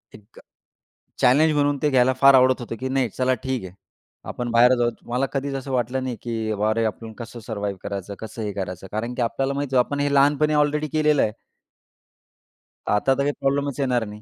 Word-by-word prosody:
एक 105 +2 -17 0.8
चॅलेंज 150 +6 +4
म्हणून 145 -1 +1
ते 150 - +2
घ्यायला 130 -1 +4
फार 140 0 +7
आवडत 130 -1 +5
होतं, 115 -1 -6
की 130 - -2
नाही 130 -2 0
चला 130 0 +2
ठीक 130 -4 -3
आहे. 95 0 -9 0.5
आपण 120 -1 -4
बाहेर 120 +2 +5
जाऊ. 120 0 +2 0.2
मला 125 +3 +1
कधीच 140 0 -2
असं 135 0 -5
वाटलं 125 +1 -1
नाही 125 -2 -3
की 115 -2 -3
अरे, 110 +2 0
आपण 110 +1 -4
कसं 120 0 -8
सर्वाईव 105 -3 -4
करायचं? 100 0 -5
कसं 110 +1 -7
हे 105 -1 -3
करायचं 95 -1 -5
कारण 115 +3 -3
की 125 - -2
आपल्याला 135 +4 -1
माहित 140 0 -2
होतं 130 - +3
आपण 145 0 -3
हे 145 0 0
लहानपणी 145 +2 +3
ऑलरेडी 150 +1 +1
केलेलं 150 0 +2
आहे. 105 - 0 1.6
आता 105 +6 +2
तर - - -4
काही 145 - +1
प्रॉब्लेमच 140 0 -1
येणार 125 -4 +1
नाही. 105 0 -10
125 Hz, 200 wpm, -23 LUFS, 110-140 Hz, 1.6 s, फार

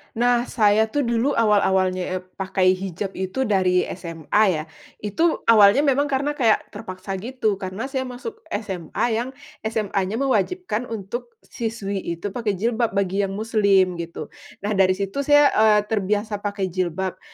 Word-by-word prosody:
Nah, 240 +1 +2
saya 215 -1 +3
tuh 285 +6 -1
dulu 235 +3 +1
awal-awalnya 190 -4 +2
ep 185 - -4 0.2
pakai 190 -1 +2
hijab 190 +1 -4
itu 190 +8 -1
dari 185 -5 +2 0.2
SMA 170 +4 0
ya. 160 -5 0 0.4
Itu 320 - 0
awalnya 215 +4 +6
memang 285 0 +2
karena 280 +1 0
kayak 240 -7 +1
terpaksa 195 -2 -6
gitu, 220 -2 -2
karena 190 +3 -5
saya 260 -2 -2
masuk 265 - -7
SMA 190 -5 -3
yang 240 +4 -2 0.2
SMAnya 210 -3 -2
mewajibkan 250 - -1
untuk 230 - -6
siswi 220 -4 -4 0.2
itu 195 +4 -5
pakai 210 -2 -2
jilbab 230 +2 0
bagi 195 0 +1
yang 195 - -6
muslim 200 -5 +2
gitu. 165 -3 -6 0.3
Nah, 205 - -1
dari 190 -2 +3
situ 195 +6 -3
saya, 290 0 +5
eee, 215 -1 +5
terbiasa 210 0 -1
pakai 200 -2 -3
jilbab. 185 +1 -2
210 Hz, 150 wpm, -23 LUFS, 190-235 Hz, 0.4 s, awalnya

